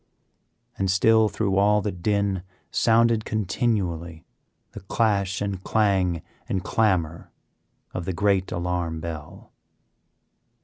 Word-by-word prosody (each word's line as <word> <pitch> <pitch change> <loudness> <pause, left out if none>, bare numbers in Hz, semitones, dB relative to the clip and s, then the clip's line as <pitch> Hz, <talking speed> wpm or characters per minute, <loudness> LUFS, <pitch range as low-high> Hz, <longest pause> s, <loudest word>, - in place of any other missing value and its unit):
And 95 -1 +1
still 110 +3 +4
through 100 -3 -1
all 105 +1 +4
the 105 0 -2
din 100 +1 0 0.3
sounded 115 -1 +3
continually 95 -7 -2 0.5
the - - -8
clash 100 -1 0
and 100 -2 -3
clang 95 -6 +1 0.3
and 95 -1 -1
clamor 90 -6 0 0.6
of 90 - -4
the 95 - -2
great 100 0 +1
alarm 85 -2 -2
bell. 80 -2 -8
95 Hz, 105 wpm, -24 LUFS, 85-105 Hz, 0.6 s, still